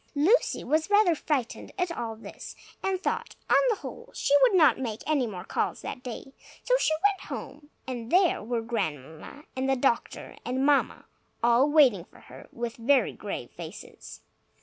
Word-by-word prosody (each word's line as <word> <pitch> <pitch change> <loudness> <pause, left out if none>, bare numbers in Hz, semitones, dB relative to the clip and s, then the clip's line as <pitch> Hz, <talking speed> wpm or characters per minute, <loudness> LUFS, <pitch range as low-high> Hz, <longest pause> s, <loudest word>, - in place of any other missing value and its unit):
Lucy 350 +13 +3
was 310 +6 0
rather 410 -4 +5
frightened 290 -6 -3
at 360 -2 -1
all 225 -1 -4
this, 220 - -10 0.3
and 380 -1 -1
thought, - - -2 0.2
on - - +7
the 450 - +2
whole, - - -9
she - - 0
would 485 -6 +5
not 315 -7 +5
make 225 -5 -4
any 290 -5 +1
more 185 -5 -7
calls - - -2
that 250 - -6
day. 250 +2 -8 0.3
So - - 0
she 315 - +2
went 400 -2 -5
home. 295 -1 -8 0.2
And 240 -3 -5
there 365 0 +4
were 230 +1 -2
Grandmamma 160 - -5
and 260 +1 -1
the 270 - +3
doctor 245 -2 -1
and 255 +3 -1
Mamma, 290 -1 +2 0.4
all 240 +4 +4
waiting 260 - +4
for - - -20
her, - - -14
with 235 -1 -5
very 255 +3 +2
grave - - -6
faces. - - -10
265 Hz, 170 wpm, -27 LUFS, 235-315 Hz, 0.4 s, on